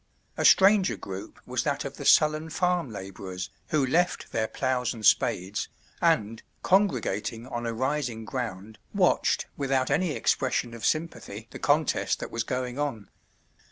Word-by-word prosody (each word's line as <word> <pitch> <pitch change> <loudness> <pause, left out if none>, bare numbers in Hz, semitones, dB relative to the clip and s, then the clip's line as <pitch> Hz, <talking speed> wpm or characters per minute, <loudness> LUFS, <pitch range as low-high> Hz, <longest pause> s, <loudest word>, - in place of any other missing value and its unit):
A - - -1
stranger 195 0 +6
group 95 0 -8
was - - -1
that - - -1
of - - -6
the - - -7
sullen 155 +1 +4
farm 180 -2 0
laborers, 95 -1 -7 0.2
who 150 -3 +2
left 175 +7 0
their 110 -1 0
ploughs 125 -1 -1
and 110 -2 -6
spades, 95 +2 +2 0.3
and, 110 +2 +2 0.2
congregating 120 - +1
on 120 -2 -4
a 115 - -2
rising 130 -3 -2
ground, 110 -3 -5 0.2
watched 185 -3 +2
without 135 -2 0
any 180 -4 +1
expression 125 -4 0
of 115 - -9
sympathy 140 -9 -3
the - - -8
contest 150 0 +1
that - - -6
was 115 - -1
going 125 +1 -3
on. 130 -8 -3
125 Hz, 150 wpm, -27 LUFS, 110-155 Hz, 0.3 s, stranger